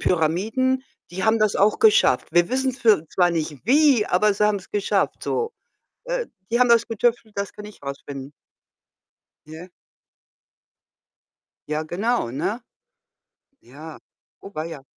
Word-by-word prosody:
Pyramiden, 215 +11 0 0.3
die 185 +2 -5
haben 220 +1 +3
das 215 -1 +2
auch 205 +2 +3
geschafft.“ 440 -1 +4
Wir 175 +1 +3
wissen 260 +1 0
für 220 - +2
zwar 180 -1 +2
nicht 155 -3 -4
wie, 270 -3 +4
aber 210 +4 +2
sie 210 - +1
haben's 200 -3 -2
geschafft 205 -1 -1
so. 460 +1 -2 0.5
Äh, - - -2 0.2
die 235 - +2
haben 250 - +5
das 235 -1 +4
getüftelt, 225 -1 -1
das 200 0 -3
kann 210 - -11
ich 210 0 -12
rausfinden. 140 0 -7 1.2
Ja. 160 +4 -10 2.0
Ja 155 +1 -1
genau, 200 - -1
ne? 200 - -2 1.0
Ja, 150 +5 -11 0.4
oh, 200 - -12
weia. 155 -2 -6
205 Hz, 130 wpm, -23 LUFS, 160-235 Hz, 2.0 s, haben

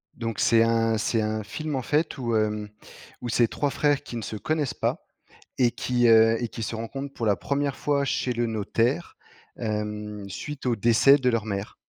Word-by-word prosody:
Donc 115 -2 -4
c'est 115 0 +5
un 115 -1 +2
c'est 110 +1 0
un 110 0 -2
film, 155 +6 -4
en 130 - -1
fait, 150 +5 0
où, 120 -3 -1
hem, 105 -1 0 0.5
où 120 - -4
c'est 120 0 +3
3 145 +5 -1
frères 145 0 +1
qui - - -8
ne - - -4
se 110 +1 -5
connaissent 150 +5 -1
pas - - -2 0.5
et 125 -2 +4
qui, 120 0 +1
heu, 115 0 +6
et 120 - -1
qui 115 - -7
se 110 - -3
rencontrent 135 +5 -5
pour 115 - -4
la 100 - +3
1re 140 -2 -1
fois 140 -1 0
chez 130 -2 -1
le 120 0 0
notaire, 115 +7 -1 0.4
hem, 105 -1 -4
suite 140 +8 -6
au 120 -2 +2
décès 120 +6 +5
de 130 -2 +1
leur 115 -3 +1
mère. 100 -1 -4
115 Hz, 200 wpm, -25 LUFS, 110-135 Hz, 0.5 s, heu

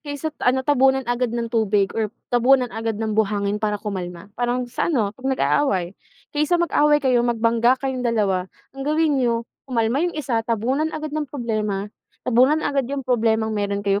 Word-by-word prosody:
Kaysa 295 +1 -5
ano, 260 +1 +2
tabunan 265 -2 +3
agad 245 +1 0
ng 235 0 -4
tubig 210 -4 +2
or 220 -1 -1 0.2
tabunan 250 0 +3
agad 225 -1 -3
ng 220 0 -2
buhangin 205 -1 0
para 210 -1 0
kumalma. 190 -2 -6
Parang 245 +2 -1
sa 245 +7 -2
ano, 220 -10 +1
'pag 260 +3 -5
nag-aaway. 200 -9 +1 0.4
Kaysa 300 +4 +2
mag-away 295 -4 +2
kayo, 250 -2 +4
magbangga 235 +1 +2
kayong 265 -1 -2
dalawa, 205 -6 0 0.2
ang 270 - -10
gawin 300 0 +1
niyo 235 -1 0 0.2
kumalma 235 +2 +1
yung 345 -1 -1
isa, 245 -6 0
tabunan 240 +7 0
agad 310 -1 -5
ng 305 -3 -2
problema, 215 -6 -2 0.4
tabunan 260 +6 +3
agad 275 -3 0
yung 275 -2 -3
problemang 225 -3 +1
meron 200 -1 -2
kayo 200 0 +2
240 Hz, 170 wpm, -22 LUFS, 215-270 Hz, 0.4 s, kayo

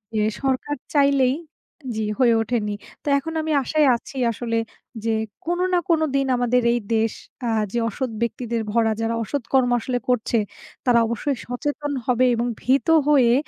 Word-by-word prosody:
যে 215 - +2 0.2
সরকার 270 +2 -1 0.2
চাইলেই 275 -2 +4 0.6
জি, 220 0 -1
হয়ে 245 -3 +5
ওঠেনি। 220 -2 -1 0.3
তো - - -12
এখন 320 +4 -4
আমি 315 0 -2
আশায় 305 +2 +2
আছি 250 +3 -9
আসলে 230 +1 -2 0.5
যে 225 - +1 0.3
কোনো 350 +2 0
না 355 - +4
কোনো 325 -2 +3
দিন 275 -1 +2
আমাদের 245 0 +2
এই 240 - +1 0.2
দেশ 225 0 +1 0.3
আ - - 0 0.3
যে 240 - +1
অসৎ 255 +3 -3
ব্যক্তিদের 235 0 -2
ভরা, 225 0 +2
যারা 225 0 0
অসৎ 280 +4 -3
কর্ম 260 -2 +4
আসলে 245 +2 -2
করছে, 245 -1 +1 0.5
তারা 245 -2 +5
অবশ্যই 240 +4 -2
সচেতন 290 +4 -3
হবে 250 0 +3
এবং 235 +1 -1
ভীত 270 +6 +2 0.2
হয়ে 260 -6 +5
250 Hz, 165 wpm, -23 LUFS, 230-280 Hz, 0.6 s, হয়ে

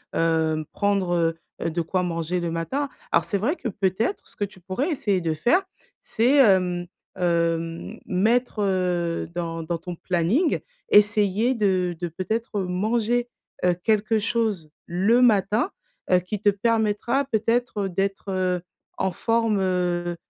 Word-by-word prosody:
heu, 160 -1 +2
hem, 155 - -4
prendre, 200 -3 0
heu 165 -1 +1 0.2
heu, 170 - 0
de 170 +1 -1
quoi 180 +3 -1
manger 170 +1 -2
le 170 -1 -2
matin. 260 - -2 0.2
Alors - - +3
c'est 200 - -1
vrai 275 - 0
que 245 - -4
peut-être, 195 - -1
ce - - -14
que 205 - 0
tu 190 -2 -15
pourrais 220 - -2
essayer 205 - 0
de 165 -2 -1
faire, 245 - +3 0.4
c'est, 245 +6 +2
hem 180 -7 +4 0.3
hem, 170 -1 -1
mettre, 220 +4 +1
heu, 180 -3 0
dans 165 -1 -3
dans 165 +1 -2
ton 175 +1 -7
planning, 185 - +1 0.3
essayer 210 +3 +4
de, 185 -6 +1
de 175 - -2
peut-être, 205 +5 -3
heu, - - 0
manger, 225 +6 0 0.4
heu, 180 - +4
quelque 215 0 +2
chose 215 -7 -1 0.2
le 200 +8 +2
matin, 215 - +3 0.4
heu, 180 -1 +5
qui 185 +3 -5
te 210 - -2
permettra 225 +5 +1
peut-être, 230 -2 0
heu, 195 - -1
d'être, 195 +2 -2
heu, 185 -1 0 0.4
en 190 - 0
forme, 225 0 +1
heu 175 -2 0
190 Hz, 155 wpm, -24 LUFS, 175-225 Hz, 0.4 s, heu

